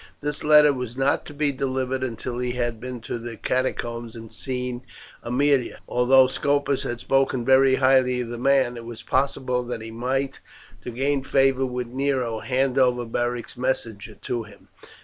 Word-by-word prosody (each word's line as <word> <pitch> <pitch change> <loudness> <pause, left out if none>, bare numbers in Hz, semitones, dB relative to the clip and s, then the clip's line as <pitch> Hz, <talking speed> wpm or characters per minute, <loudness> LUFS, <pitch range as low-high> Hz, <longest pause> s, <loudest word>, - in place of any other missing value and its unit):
This 150 0 -3
letter 150 -1 +6
was 125 -2 -5
not 135 +1 +1
to 145 - -9
be 145 0 +2
delivered 130 -1 -2
until 120 0 -4
he 125 0 -1
had 120 -2 -2
been 125 0 -6
to 115 - -5
the 115 -1 -7
catacombs 120 -1 -2
and 115 -1 -10
seen 125 -2 -4 0.4
Aemilia; 130 +1 +1
as, - - -16
although 130 +2 +5
Scopus 140 +1 0
had 120 -1 -3
spoken 135 -2 +1
very 130 0 +5
highly 130 -2 +3
of 120 - -5
the 120 0 -6
man, 130 -2 +2
it 115 - -8
was 115 -1 -8
possible 130 -2 0
that 120 -2 -5
he 115 - -7
might, 130 +4 -2 0.4
to - - -7
gain 135 +3 0
favour 135 -1 +2
with 125 0 -3
Nero, 130 -2 -1
hand 130 +2 0
over 125 -2 +2
Beric's 120 +1 -3
messenger 115 -4 -3
to 120 +4 -4
him. 105 -2 -15
125 Hz, 175 wpm, -24 LUFS, 120-135 Hz, 0.4 s, letter